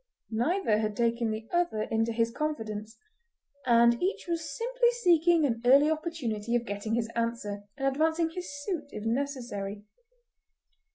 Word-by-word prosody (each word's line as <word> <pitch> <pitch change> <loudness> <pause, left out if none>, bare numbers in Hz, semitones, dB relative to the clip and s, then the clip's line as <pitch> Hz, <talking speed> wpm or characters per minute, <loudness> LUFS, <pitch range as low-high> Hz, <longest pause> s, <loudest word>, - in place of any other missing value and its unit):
Neither 235 - +1
had 215 -1 -2
taken 235 -1 +1
the 220 +1 -4
other 345 -12 +1
into 225 +1 0
his 230 0 +1
confidence, 220 -7 -4 0.7
and 235 0 +5
each 380 +3 -1
was 325 -4 -3
simply - - +2
seeking 340 -2 +5
an 230 -4 -1
early 280 +5 +6
opportunity 250 -9 -2
of 240 0 0
getting 205 +1 -2
his 230 -1 -1
answer, 230 -3 -2
and 270 -1 0
advancing 320 +4 +1
his 360 +1 -6
suit 330 -6 -3
if 215 -5 -7
necessary. 230 -6 -3
240 Hz, 145 wpm, -29 LUFS, 220-315 Hz, 0.7 s, early